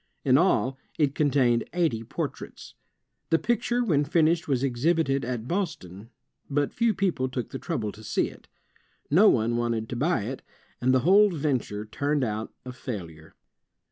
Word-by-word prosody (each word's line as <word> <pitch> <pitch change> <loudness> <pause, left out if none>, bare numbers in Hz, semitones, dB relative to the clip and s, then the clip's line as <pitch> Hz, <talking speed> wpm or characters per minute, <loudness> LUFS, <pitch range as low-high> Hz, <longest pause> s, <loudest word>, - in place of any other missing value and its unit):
In 130 -2 +5
all, 135 - +2 0.2
it 145 -4 +2
contained 130 -6 +2
eighty 160 -11 +1
portraits. - - -6 0.6
The 165 - +4
picture 240 +4 0
when 155 -10 +2
finished 160 +2 +2
was 135 -3 0
exhibited 140 +2 +1
at 120 -1 -4
Boston, 115 - -4 0.4
but 145 0 0
few 230 -2 +1
people 170 -10 0
took 125 -2 -4
the 135 - -5
trouble 115 -12 -3
to 110 - -14
see - - 0
it. - - -14 0.6
No 195 +8 +7
one 120 0 +1
wanted 115 -2 -1
to - - -4
buy 145 - +1
it, 130 +5 -5 0.4
and 130 +1 +3
the 130 -1 +3
whole 200 +8 +6
venture 135 - -2
turned 145 +6 -1
out 110 -1 -3
a 125 - -5
failure. 85 - -8
135 Hz, 160 wpm, -26 LUFS, 120-165 Hz, 0.6 s, No